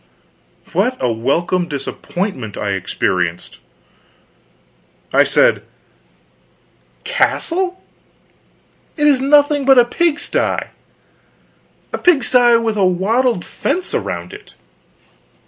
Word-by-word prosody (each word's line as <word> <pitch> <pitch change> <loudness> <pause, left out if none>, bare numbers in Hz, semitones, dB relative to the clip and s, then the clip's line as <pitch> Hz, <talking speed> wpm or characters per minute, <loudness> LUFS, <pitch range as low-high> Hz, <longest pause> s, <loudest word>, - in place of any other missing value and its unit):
What 255 +1 0
a 125 - 0
welcome 170 +10 -1
disappointment 140 - -5
I 100 - -2
experienced! 90 -2 -3 1.5
I - - +5
said: - - +2 1.4
"Castle? 365 - 0 1.1
It 295 - +1
is 280 -3 +4
nothing 290 +1 +3
but 270 -1 +5
a 245 - +6
pigsty; 325 +5 0 1.4
a - - -1
pigsty 250 -8 +4
with 225 -2 -2
a 200 - +2
wattled 195 +4 +1
fence 365 0 -2
around - - -4
it." 415 0 -14
235 Hz, 90 wpm, -17 LUFS, -, 1.5 s, a